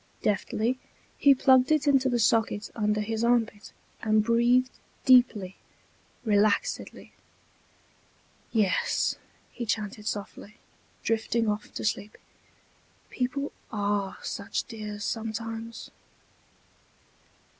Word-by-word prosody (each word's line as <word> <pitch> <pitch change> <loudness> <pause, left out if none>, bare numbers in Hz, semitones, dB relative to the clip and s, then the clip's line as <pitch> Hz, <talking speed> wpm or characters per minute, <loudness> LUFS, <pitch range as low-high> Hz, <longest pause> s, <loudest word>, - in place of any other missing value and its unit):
Deftly 220 +4 0 0.4
he 280 -1 +5
plugged 260 +1 +4
it 310 -1 +3
into 270 -2 +4
the 245 - +1
socket 220 -2 +1
under 210 -1 0
his 220 +1 -2
armpit, 230 -3 +1 0.3
and 215 -1 +3
breathed 240 +3 +3 0.3
deeply, 240 -7 +4 0.7
relaxedly. 210 -1 0 1.4
"Yes," 205 -5 +1 0.3
he 245 - -6
chanted 210 -1 -3
softly, 205 0 -5 0.5
drifting 225 0 0
off 210 0 -2
to - - -4
sleep, 210 -1 -2 0.9
"people 260 +3 -2 0.2
are 205 -2 -1
such 200 - -3
dears 210 -3 -7
sometimes." 225 0 -5
225 Hz, 90 wpm, -27 LUFS, 210-245 Hz, 1.4 s, he